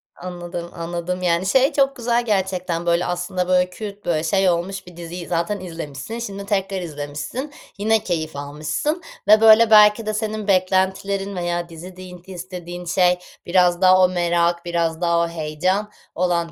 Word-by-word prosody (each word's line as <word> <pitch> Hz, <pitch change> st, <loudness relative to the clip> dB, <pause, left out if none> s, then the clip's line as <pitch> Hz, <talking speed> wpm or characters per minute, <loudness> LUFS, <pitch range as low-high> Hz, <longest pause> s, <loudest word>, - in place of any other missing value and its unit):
Anladım, 175 Hz, -1 st, -7 dB
anladım. 175 Hz, +2 st, -4 dB
Yani, 175 Hz, +1 st, +1 dB
şey 265 Hz, +8 st, +3 dB
çok 275 Hz, -1 st, +2 dB
güzel 240 Hz, 0 st, 0 dB
gerçekten, 185 Hz, -5 st, -1 dB
böyle, 170 Hz, +1 st, +2 dB
aslında, 180 Hz, +1 st, -2 dB
böyle, 180 Hz, 0 st, +3 dB
kült, 205 Hz, +1 st, -8 dB
böyle, 160 Hz, -2 st, 0 dB
şey 190 Hz, +3 st, +2 dB
olmuş 185 Hz, +3 st, -2 dB
bir 175 Hz, -1 st, -13 dB
diziyi 170 Hz, 0 st, -7 dB
zaten 170 Hz, +4 st, -1 dB
izlemişsin, 170 Hz, -, -7 dB
şimdi 200 Hz, -3 st, -6 dB
tekrar 195 Hz, -1 st, -1 dB
izlemişsin. 150 Hz, -, -5 dB, 0.3 s
Yine 215 Hz, +1 st, +2 dB
keyif 160 Hz, -6 st, -3 dB
almışsın 150 Hz, -, -3 dB, 0.3 s
ve, 215 Hz, +1 st, +7 dB
böyle, 225 Hz, 0 st, +7 dB
belki 210 Hz, +1 st, +7 dB
de 215 Hz, -, -2 dB
senin 215 Hz, -1 st, -3 dB
beklentilerin 190 Hz, +1 st, +1 dB
veya 175 Hz, -1 st, -2 dB
dizi 175 Hz, +3 st, -10 dB
diyin 185 Hz, -1 st, -10 dB
t 190 Hz, -, -14 dB
istediğin 180 Hz, -1 st, -7 dB
şey 180 Hz, +1 st, +2 dB, 0.3 s
biraz 175 Hz, 0 st, +3 dB
daha 185 Hz, 0 st, +6 dB
o 180 Hz, -, +5 dB
merak, 170 Hz, -1 st, +1 dB
biraz 170 Hz, -1 st, -1 dB
daha 170 Hz, -1 st, +2 dB
o 170 Hz, -, +1 dB
heyecan 170 Hz, +6 st, -2 dB, 0.2 s
olan 170 Hz, -1 st, 0 dB
180 Hz, 165 wpm, -21 LUFS, 170-200 Hz, 0.3 s, ve